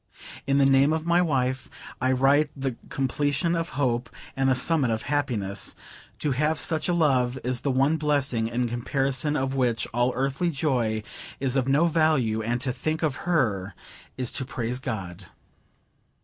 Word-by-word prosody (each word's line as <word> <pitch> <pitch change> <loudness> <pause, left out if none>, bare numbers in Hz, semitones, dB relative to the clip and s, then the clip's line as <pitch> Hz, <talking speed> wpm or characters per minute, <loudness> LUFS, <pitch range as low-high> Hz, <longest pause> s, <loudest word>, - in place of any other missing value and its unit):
In 140 0 +3
the 140 - +5
name 135 +2 +4
of 160 0 -2
my 170 +1 +3
wife 130 -6 0 0.3
I 130 +1 +2
write 140 +3 +3
the 135 -3 -3
completion 145 +5 0
of 165 0 -2
hope, 125 -3 0 0.3
and 135 -1 +2
the 130 - +3
summit 140 0 +2
of 110 -1 -1
happiness. 115 -10 -1 0.4
To 150 - -1
have 150 +4 +1
such 160 +3 -1
a - - +2
love 130 -6 +2
is 125 0 0
the 140 - -2
one 135 +4 +2
blessing, 145 -7 +1
in 120 +1 -1
comparison 135 +4 0
of 135 0 -1
which 125 -4 +1
all 120 +2 +2
earthly 135 +6 0
joy 125 -8 0 0.4
is 130 -1 -1
of 130 -1 +1
no 145 +5 +4
value; 155 -9 +2
and 120 +2 -1
to 130 -2 -1
think 155 +6 -2
of 150 -4 +1
her, 105 - 0 0.4
is 130 -2 -1
to 130 - 0
praise 125 -1 -3
God. 95 -6 -5
135 Hz, 170 wpm, -26 LUFS, 120-150 Hz, 0.4 s, the